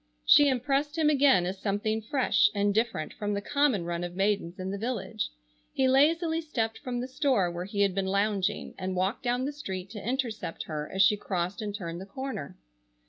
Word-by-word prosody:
She 290 -1 +7
impressed 275 +4 0
him 305 -2 +4
again 270 -10 +4
as 190 +2 -4
something 215 +2 -1
fresh 260 +4 +3
and 205 0 +2
different 220 -8 -1
from 205 -1 -2
the - - 0
common 280 -6 +1
run 170 0 -3
of 175 0 -5
maidens 195 -3 0
in 185 +1 -4
the 200 - -3
village. 225 - -3 0.4
He 265 - +2
lazily 320 +5 +3
stepped 230 -8 -2
from 250 -4 -3
the 250 - -4
store 255 -9 +1
where 175 +1 -5
he 200 +1 -2
had 200 -2 +3
been 195 0 -1
lounging 200 0 0
and 185 0 -3
walked 190 +7 0
down 250 0 0
the 290 - -3
street 190 -9 -6
to 210 -3 -7
intercept 235 -7 -3
her 150 -1 -5
as 190 0 +4
she 205 +2 +4
crossed 185 +1 -3
and 205 -1 -4
turned 170 -3 -5
the 190 - -9
corner. 260 - -6
210 Hz, 200 wpm, -28 LUFS, 190-265 Hz, 0.4 s, She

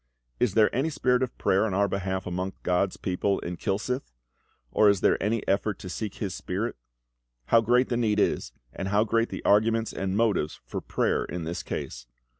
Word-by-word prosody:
Is 115 -6 +1
there 110 -2 +4
any 135 +6 +1
spirit 125 -4 +1
of 130 -2 -2
prayer 95 - +2
on 105 -4 -1
our 100 +1 +3
behalf 95 -1 -2
among 90 +2 -3
GOD's 90 +2 +1
people 95 +1 0
in 90 +1 -4
Kilsyth? 110 - -2 0.6
or 105 - +5
is 100 -2 +2
there - - +3
any 105 +2 -1
effort 100 +1 +1
to 90 - -8
seek 105 +2 -5
this 100 -4 -3
spirit? - - -3 0.7
How 115 - +6
great 125 +3 +3
the 120 - 0
need 110 -3 +1
is, - - +1 0.2
and 95 - -4
how 105 +2 +3
great 115 +1 +1
the - - -7
arguments 110 +2 +3
and 95 +1 -2
motives 105 -9 +1
for - - -5
prayer - - 0
in 85 -1 -5
this 85 +2 -3
case. - - -6
105 Hz, 195 wpm, -27 LUFS, 95-115 Hz, 0.7 s, How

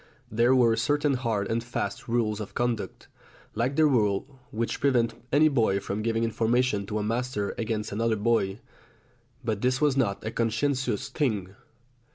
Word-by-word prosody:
There 120 +4 +4
were 120 -3 +4
certain 145 +4 +1
hard 115 -6 -1
and 115 +1 -1
fast 100 -4 -4
rules 115 -3 0
of 105 - -7
conduct, 120 -3 -2 0.5
like 120 +5 -1
the 155 - +5
rule 125 0 +1
which 115 +1 -2
prevented 120 -4 +1
any 150 +3 +5
boy 115 -9 +2
from 100 +2 -4
giving 115 +1 0
information 115 -2 +1
to 105 - -2
a 105 - -1
master 115 -2 -2
against 110 -1 -3
another 115 +2 +1
boy. 105 -3 +1 0.9
But 110 -3 -1
this 125 +1 +1
was 150 -3 +3
not 110 -8 0
a 110 - -2
conscientious 115 0 0
thing. 105 - -1
115 Hz, 160 wpm, -27 LUFS, 105-125 Hz, 0.9 s, the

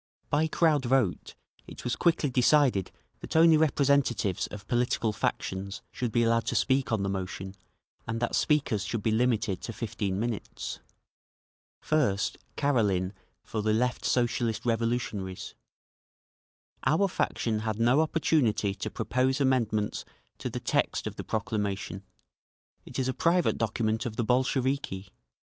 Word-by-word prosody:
By 150 +2 +3
crowd 155 -4 +2
vote 120 -7 +1 0.3
it - - -10
was 120 - -1
quickly 165 -5 +2
decided 125 - +3 0.3
that - - -7
only 165 0 +7
representatives 140 - +2
of 105 0 -9
political 120 -3 +1
factions 100 0 -3
should 125 -2 -3
be 120 +2 +2
allowed 115 0 +2
to - - -1
speak 130 -2 +2
on 110 -3 +1
the - - 0
motion 95 0 -4 0.5
and 115 0 -2
that 120 - -1
speakers 140 -10 +1
should 115 -4 -3
be 110 - +2
limited 110 -4 +1
to - - -5
fifteen 105 -4 -3
minutes. 115 +1 -4 1.0
First 105 -11 +1 0.2
Karelin 105 -9 +1 0.3
for 110 - -3
the 110 0 +1
Left 125 +3 0
Socialist 120 -2 0
Revolutionaries. 115 -5 -2 1.3
"Our 160 +9 +3
faction 115 - -1
had 110 0 -3
no 120 +6 +4
opportunity 150 -10 +1
to - - -4
propose 130 +2 0
amendments 115 -6 +1 0.4
to - - -3
the - - -4
text - - 0
of - - -4
the - - -6
proclamation; 105 -4 -2 0.9
it - - -7
is 130 - 0
a 130 - 0
private 170 +4 +2
document 110 +1 0
of 110 - -6
the 120 - 0
Bolsheviki. 130 -5 0
115 Hz, 140 wpm, -28 LUFS, 105-135 Hz, 1.3 s, only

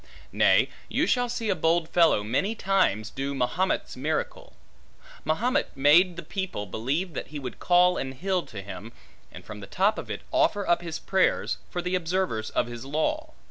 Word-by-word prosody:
Nay, - - +4 0.2
you - - +1
shall 245 -1 +1
see 230 -3 -1
a - - +1
bold 165 0 +1
fellow 165 -11 +3
many 165 - 0
times 185 - +1
do 140 +1 -3
Mahomet's 165 +9 -1
miracle. - - -3 0.7
Mahomet 220 - 0
made 170 +6 +5
the 170 - -7
people 190 - -4
believe 140 - -2
that - - -5
he 150 - -7
would 130 -5 -7
call 180 0 +4
an 130 0 -3
hill 185 +6 -1
to 100 -3 -8
him, 100 +3 -9 0.4
and - - -12
from 110 -1 -8
the 100 - -9
top 200 - +1
of - - -8
it - - -5
offer 320 -12 +2
up 175 0 +3
his 170 -2 -5
prayers, 190 -1 +1
for 175 - -4
the 180 +1 -2
observers 180 -10 -1
of - - 0
his 120 0 -8
law. 305 - -2
170 Hz, 180 wpm, -26 LUFS, 130-190 Hz, 0.7 s, made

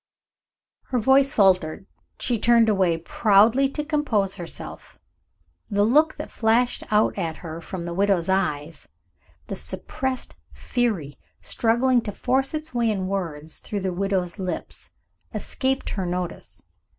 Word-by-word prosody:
Her 255 - -1
voice 265 +4 +4
faltered. 190 - +2 0.3
She 240 -3 0
turned 230 0 +5
away 185 -5 +2
proudly 220 +9 +4
to 300 +2 -4
compose 245 -11 +1
herself. 175 -4 -7 0.7
The 205 0 +2
look 300 +8 +4
that - - -7
flashed 235 +2 +2
out 215 0 +3
at 160 -2 -2
her 165 +1 -6
from 170 0 -6
the 170 - -4
widow's 195 -2 +2
eyes, 165 -5 -1 0.6
the - - -5
suppressed 265 -1 -4 0.2
fury 210 - -2 0.2
struggling 240 +2 +2
to 210 - -4
force 265 +6 0
its 310 -1 -5
way 235 -2 +1
in 195 -3 -1
words 165 -6 -4
through 205 -2 -4
the 185 -1 -1
widow's 190 -1 -1
lips, 185 -1 -4 0.5
escaped 265 0 -1
her 190 -3 -2
notice. 180 0 -5
205 Hz, 135 wpm, -24 LUFS, 180-245 Hz, 0.7 s, turned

